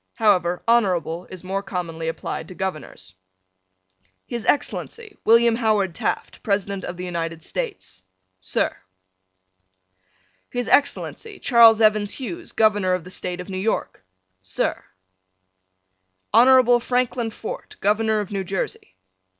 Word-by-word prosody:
However, 180 -6 +2
Honorable 185 -7 +1
is 185 -1 -10
more 195 +2 -2
commonly 170 -4 -5
applied 165 0 -4
to 185 - -11
Governors: 155 - -6 1.1
His 235 -2 -5
Excellency, 425 +8 -1
William 230 0 +5
Howard 210 -6 +1
Taft, - - -3
President 200 -2 -1
of 175 - -6
the 180 - -5
United 165 -2 -4
States. 415 - -5 0.4
Sir: 95 - 0 1.7
His 245 -1 -3
Excellency, 395 +8 +1
Charles 230 -3 +6
Evans 215 -1 +3
Hughes, 335 +6 -6
Governor 205 -4 +2
of 180 - -5
the 180 - -11
State 180 -1 -4
of 180 - -10
New 185 -1 -4
York. 220 - -2 0.4
Sir: 95 0 -2 1.5
Honorable 245 +1 +6
Franklin 245 -1 0
Fort, 220 - -8
Governor 215 +1 +2
of 205 - -7
New 195 -1 -2
Jersey. 180 - -4
205 Hz, 120 wpm, -22 LUFS, 180-235 Hz, 1.7 s, Charles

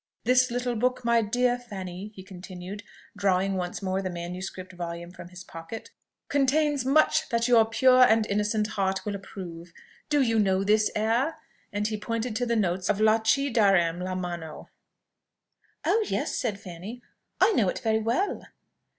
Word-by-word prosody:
This 255 +2 +4
little 245 0 -2
book, 250 +2 0
my 235 0 +4
dear 245 +3 +1
Miss 245 - -19
Fanny," 190 -2 -6
he 190 - -10
continued, 185 +1 -9 0.3
drawing 195 -1 +1
once 180 0 -4
more 190 0 -1
the 185 - -3
manuscript 180 +1 -6
volume 170 -1 -6
from 175 - -11
his 180 0 -11
pocket, 165 +7 -9 0.4
"contains 285 0 +2
much 310 +3 +3
that 235 0 +1
your 235 -2 +6
pure 255 +3 +4
and 225 -3 +5
innocent 210 +1 0
heart 195 -2 -1
will 210 - -2
approve. 180 -4 -8 0.4
Do 295 -2 +3
you 230 -3 +2
know 190 -2 +2
this 215 +1 +3
air?" 230 +8 +1 0.4
and 205 0 -1
he 215 -1 -3
pointed 230 +1 -3
to 245 0 -1
the 235 - +1
notes 185 -3 0
of 210 - +2
"Là 220 +1 +3
ci 275 +5 +2
darem' 190 -7 +3
la 185 0 -3
mano." 175 -3 -6 1.2
"Oh 445 +1 +3
yes!" - - -1
said 215 -6 -2
Fanny; 205 +5 -9 0.4
"I - - +5
know 215 - +2
it - - -3
very 220 -2 +1
well." 235 - -1
210 Hz, 170 wpm, -27 LUFS, 185-240 Hz, 1.2 s, your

